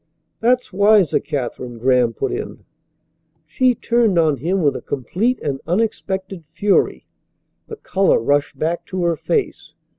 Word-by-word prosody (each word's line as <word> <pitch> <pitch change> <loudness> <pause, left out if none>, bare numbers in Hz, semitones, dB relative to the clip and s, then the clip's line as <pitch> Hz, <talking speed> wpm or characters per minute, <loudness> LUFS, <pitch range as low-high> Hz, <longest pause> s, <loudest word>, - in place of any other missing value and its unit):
"That's 245 -2 +1
wiser, 200 -3 +4
Katherine," 125 -4 -5
Graham 125 0 +2
put - - -3
in. - - -6 0.8
She 250 +11 +1
turned 230 -5 +1
on 155 -4 +3
him 175 +7 -1
with 145 - +2
a - - -5
complete 185 - -2
and 135 -2 -3
unexpected 190 -2 -2
fury. 205 -1 +1 0.6
The 445 - -7
colour 195 - +1
rushed 145 +5 0
back 165 +2 -2
to 185 -1 -3
her 170 -1 +1
face. 420 - -3
175 Hz, 140 wpm, -19 LUFS, 145-210 Hz, 0.8 s, wiser